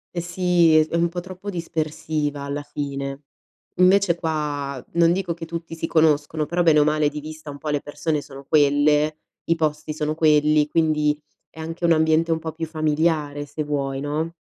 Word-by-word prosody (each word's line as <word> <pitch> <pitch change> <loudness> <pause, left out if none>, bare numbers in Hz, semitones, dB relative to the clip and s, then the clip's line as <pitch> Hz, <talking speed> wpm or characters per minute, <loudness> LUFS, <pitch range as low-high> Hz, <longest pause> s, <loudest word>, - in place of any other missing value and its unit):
E 170 - -1
sì, 175 -1 +3
è 155 0 +4
è 165 - -4
un 170 0 +2
po' 175 +1 -4
troppo 185 +2 -8
dispersiva 155 -4 -3
alla 140 +1 -3
fine. 140 -1 -5 0.6
Invece 185 -1 +5
qua, 145 -5 -3
non 170 0 +4
dico 180 -1 -1
che 165 0 -8
tutti 165 0 -6
si 165 - -3
conoscono, 155 -1 +2
però 175 +3 0
bene 160 -3 +5
o - - +6
male 150 0 +2
di 150 0 -6
vista 155 0 -9
un 140 - -9
po' 155 - -5
le 145 -1 0
persone 150 +1 -2
sono 135 -1 -12
quelle, 150 +1 +3 0.3
i 165 - +2
posti 155 -1 -2
sono 150 0 -2
quelli, 150 -1 +4
quindi 150 -2 +1 0.3
è 160 - -15
anche 165 +2 -4
un 170 - +4
ambiente 160 +1 +3
un 160 - +1
po' 160 0 -5
più 165 0 -4
familiare 155 -2 0
se 145 +2 -4
vuoi, 140 -2 -2
no? 155 +3 -2
155 Hz, 190 wpm, -23 LUFS, 150-165 Hz, 0.6 s, o